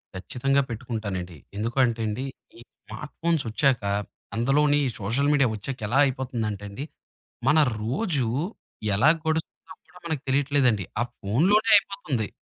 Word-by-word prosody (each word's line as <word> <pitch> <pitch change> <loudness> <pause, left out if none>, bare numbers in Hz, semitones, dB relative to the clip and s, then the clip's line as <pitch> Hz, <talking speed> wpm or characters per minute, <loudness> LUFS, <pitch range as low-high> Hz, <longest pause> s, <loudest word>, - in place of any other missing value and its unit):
ఖచ్చితంగా 130 +9 +1
పెట్టుకుంటానండి. 105 -7 -4 0.2
ఎందుకంటేండి, 115 0 0 0.3
ఈ - - -13 0.3
స్మార్ట్ - - -8
ఫోన్సొచ్చాక, 135 -5 +1 0.5
అందులోని 145 +5 +3
ఈ - - 0
సోషల్ 120 +9 +1
మీడియా 140 -3 +4
ఒచ్చాక 125 +6 -6
ఎలా 120 +5 +1
అయిపోతుందంటే 120 -6 -2
అండి. 130 +9 -6 0.6
మన 160 - +5 0.2
రోజు, 135 - 0 0.7
ఎలా 120 +10 +5 0.2
గడుస్తుందో 160 +3 -3
కూడా 180 +3 -17
మనకు 160 -5 -2
తెలియట్లేదండి. 130 -7 +2 0.2
ఆ - - +4 0.2
ఫోనులోనే 180 - +3
అయిపోతుంది. 155 - -2
130 Hz, 115 wpm, -26 LUFS, 110-145 Hz, 0.7 s, మన